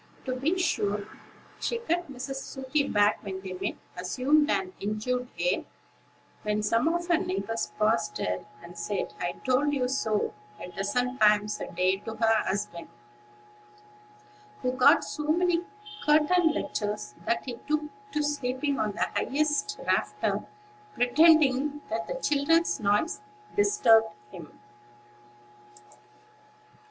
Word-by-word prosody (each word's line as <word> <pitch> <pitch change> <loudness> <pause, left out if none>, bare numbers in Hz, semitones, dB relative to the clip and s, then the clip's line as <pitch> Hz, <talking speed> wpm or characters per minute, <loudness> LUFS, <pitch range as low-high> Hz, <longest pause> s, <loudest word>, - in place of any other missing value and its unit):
To 255 -1 -2
be 305 +8 0
sure, 205 - 0 0.5
she 475 - -1
cut 350 -9 -2
Mrs. 270 +1 -5
Sooty 270 +2 -2
back 205 0 +3
when 190 -2 -5
they 190 -1 -6
met; 180 - -3 0.2
assumed 270 +12 +2
an 375 -1 0
injured 230 +5 -2
air, - - +1 0.8
when 210 0 -1
some 230 +6 +2
of 345 +1 0
her 345 -2 +3
neighbors 360 -12 -2
passed 170 -6 +1
her; 90 0 -2 0.2
and 170 +1 -11
said, 170 +4 -3
"I 175 - -2
told 285 +3 +2
you 255 -2 +1
so," 220 -5 0 0.3
a - - -7
dozen 245 +7 -1
times 210 -1 +3
a - - -5
day 185 +2 +2
to 220 +2 -7
her 225 -1 +3
husband, 190 -3 -3 1.8
who 250 - +1
got 260 +5 +5
so 300 - -5
many 345 +2 +2 0.4
curtain 315 +3 +4
lectures 210 - -3
that 230 - 0
he 245 -3 -5
took 305 0 +1 0.3
to 300 - +1
sleeping 280 0 -1
on 210 -1 0
the - - 0
highest 305 +9 0
rafter, - - 0 0.5
pretending 290 +1 +4
that 225 +1 -2
the - - -3
children's 330 - +2
noise 210 - +1 0.3
disturbed 400 - +4 0.2
him. 165 -4 -11
255 Hz, 130 wpm, -28 LUFS, 210-305 Hz, 1.8 s, got